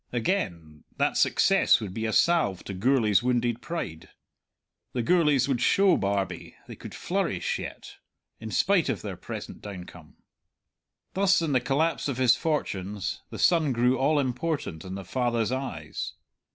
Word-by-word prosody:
Again, 90 Hz, -, -2 dB
that -, -, +1 dB
success -, -, +4 dB
would 100 Hz, -4 st, -6 dB
be 110 Hz, +2 st, -2 dB
a -, -, -1 dB
salve 155 Hz, -, +2 dB
to 100 Hz, -, -6 dB
Gourlay's 110 Hz, 0 st, +3 dB
wounded 120 Hz, -1 st, 0 dB
pride; 115 Hz, -, -5 dB, 0.8 s
the 120 Hz, -, -1 dB
Gourlays 150 Hz, -4 st, +3 dB
would 130 Hz, -4 st, 0 dB
show 195 Hz, -1 st, +4 dB
Barbie 100 Hz, -3 st, -2 dB
they -, -, -8 dB
could -, -, -10 dB
flourish -, -, -1 dB
yet, -, -, -8 dB, 0.4 s
in 110 Hz, -, -7 dB
spite 180 Hz, -, +2 dB
of 110 Hz, -9 st, -2 dB
their -, -, -5 dB
present -, -, -8 dB
downcome. 90 Hz, -5 st, -10 dB, 1.0 s
Thus, 195 Hz, 0 st, +3 dB
in 165 Hz, -3 st, -1 dB
the 130 Hz, -3 st, +2 dB
collapse 145 Hz, +7 st, 0 dB
of 135 Hz, -4 st, -3 dB
his 125 Hz, -2 st, +5 dB
fortunes, 105 Hz, -, -3 dB
the -, -, -7 dB
son 160 Hz, -6 st, +3 dB
grew 125 Hz, +2 st, +3 dB
all 150 Hz, +3 st, +2 dB
important 130 Hz, -, -2 dB
in 95 Hz, 0 st, -6 dB
the 95 Hz, -1 st, -7 dB
father's 120 Hz, +1 st, 0 dB
eyes. 90 Hz, -, -4 dB
120 Hz, 150 wpm, -27 LUFS, 100-150 Hz, 1.0 s, his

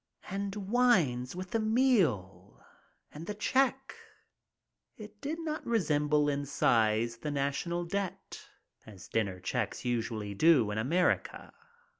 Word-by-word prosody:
And 200 Hz, 0 st, -3 dB
wines 190 Hz, -, +2 dB
with 185 Hz, 0 st, -7 dB
the 225 Hz, -, +1 dB
meal! 165 Hz, -, +1 dB, 0.5 s
And 160 Hz, +3 st, -9 dB
the 210 Hz, -, -4 dB
check; 265 Hz, +4 st, +1 dB, 1.0 s
it 210 Hz, -1 st, -12 dB
did 310 Hz, +4 st, -4 dB
not 315 Hz, -2 st, -4 dB
resem 155 Hz, -10 st, 0 dB
ble 150 Hz, 0 st, +3 dB
in 145 Hz, 0 st, -1 dB
size 115 Hz, -3 st, +2 dB
the 150 Hz, -, -5 dB
national 145 Hz, +5 st, -2 dB
debt, 195 Hz, +1 st, -5 dB, 0.4 s
as 95 Hz, -4 st, -12 dB
dinner 100 Hz, -5 st, -1 dB
checks 115 Hz, +6 st, -3 dB
usually 115 Hz, -4 st, -2 dB
do 125 Hz, -2 st, +4 dB
in 105 Hz, -, -2 dB
America. 170 Hz, +11 st, 0 dB
150 Hz, 125 wpm, -31 LUFS, -, 1.0 s, do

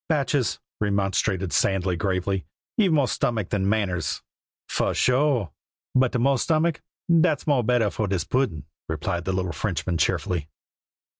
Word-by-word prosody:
"Batchees," 140 Hz, -4 st, +1 dB, 0.2 s
remonstrated 100 Hz, -2 st, 0 dB
Sandy 95 Hz, -2 st, +2 dB
gravely, 95 Hz, +1 st, -1 dB, 0.3 s
"ye've 200 Hz, -6 st, +3 dB
more 145 Hz, -4 st, +3 dB
stomach 110 Hz, -7 st, -1 dB
than 100 Hz, -2 st, 0 dB
manners." 100 Hz, -5 st, -1 dB, 0.4 s
"Fu -, -, 0 dB
sure! 130 Hz, -, +2 dB, 0.4 s
but 130 Hz, -1 st, +3 dB
de 125 Hz, -, 0 dB
more 135 Hz, +2 st, +2 dB
stomach, 160 Hz, +2 st, +1 dB, 0.4 s
dat's 160 Hz, -3 st, +2 dB
more 140 Hz, -5 st, +3 dB
better 115 Hz, -3 st, +2 dB
for 110 Hz, +3 st, -2 dB
dis 95 Hz, -4 st, 0 dB
puddin'," 115 Hz, -, -1 dB, 0.2 s
replied 85 Hz, 0 st, -2 dB
the 95 Hz, -, 0 dB
little 95 Hz, -1 st, -1 dB
Frenchman 85 Hz, -2 st, -2 dB
cheerfully. 80 Hz, -4 st, 0 dB
105 Hz, 140 wpm, -25 LUFS, 95-135 Hz, 0.4 s, ye've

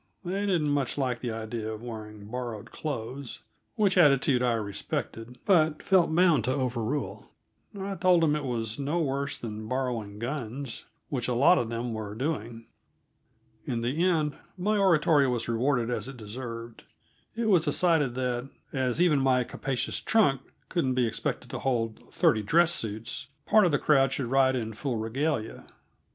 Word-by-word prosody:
They 195 Hz, +3 st, -1 dB
didn't 165 Hz, -6 st, +1 dB
much 140 Hz, -2 st, 0 dB
like 125 Hz, -4 st, 0 dB
the 125 Hz, -, -3 dB
idea 110 Hz, 0 st, -4 dB
of 110 Hz, +1 st, -7 dB
wearing 105 Hz, -3 st, -8 dB
borrowed 120 Hz, -1 st, -6 dB
clothes 130 Hz, -3 st, -5 dB, 0.3 s
which 200 Hz, -5 st, +3 dB
attitude 140 Hz, -5 st, +4 dB
I 125 Hz, -1 st, +2 dB
respected, 115 Hz, +2 st, -4 dB
but 160 Hz, -5 st, +3 dB
felt 180 Hz, -4 st, +3 dB
bound 170 Hz, -, +4 dB
to 130 Hz, -, +1 dB
overrule. 130 Hz, +1 st, -2 dB, 0.5 s
I 195 Hz, +1 st, -3 dB
told 180 Hz, -2 st, +3 dB
them 150 Hz, -2 st, +3 dB
it 150 Hz, -, -3 dB
was 115 Hz, -3 st, -3 dB
no 145 Hz, +4 st, -1 dB
worse 140 Hz, -2 st, -1 dB
than 110 Hz, -2 st, -6 dB
borrowing 120 Hz, -5 st, -2 dB
guns, 125 Hz, +1 st, -4 dB, 0.2 s
which 125 Hz, -4 st, -2 dB
a 125 Hz, -, 0 dB
lot 145 Hz, +8 st, +5 dB
of 115 Hz, -, -2 dB
them 115 Hz, 0 st, -3 dB
were 105 Hz, -2 st, -5 dB
doing. 115 Hz, -4 st, -3 dB, 1.0 s
In 115 Hz, -1 st, -2 dB
the 135 Hz, +8 st, 0 dB
end 155 Hz, -5 st, +2 dB, 0.2 s
my 205 Hz, +4 st, +1 dB
oratory 160 Hz, -7 st, +4 dB
was 120 Hz, -2 st, -1 dB
rewarded 120 Hz, +1 st, +1 dB
as 120 Hz, -, -2 dB
it 135 Hz, -1 st, -8 dB
deserved; 115 Hz, +1 st, -7 dB, 0.5 s
it 230 Hz, 0 st, -1 dB
was 180 Hz, -6 st, +4 dB
decided 150 Hz, -4 st, +2 dB
that, 125 Hz, 0 st, -2 dB, 0.2 s
as 130 Hz, 0 st, 0 dB
even 170 Hz, -5 st, +4 dB
my 130 Hz, -2 st, +3 dB
capacious 130 Hz, +1 st, -2 dB
trunks 145 Hz, -, +2 dB, 0.2 s
couldn't 135 Hz, -8 st, 0 dB
be 125 Hz, -1 st, +3 dB
expected 115 Hz, -, -3 dB
to -, -, -4 dB
hold 115 Hz, -4 st, -1 dB
thirty 110 Hz, -, +3 dB
dress 170 Hz, +10 st, +4 dB
suits, 115 Hz, +2 st, -3 dB, 0.2 s
part 215 Hz, -1 st, +5 dB
of -, -, 0 dB
the 145 Hz, -, +3 dB
crowd 135 Hz, -2 st, +3 dB
should 135 Hz, -, -1 dB
ride 135 Hz, -1 st, +4 dB
in 110 Hz, -3 st, -3 dB
full 125 Hz, +2 st, -3 dB
regalia. 115 Hz, +2 st, -2 dB
130 Hz, 165 wpm, -28 LUFS, 115-150 Hz, 1.0 s, lot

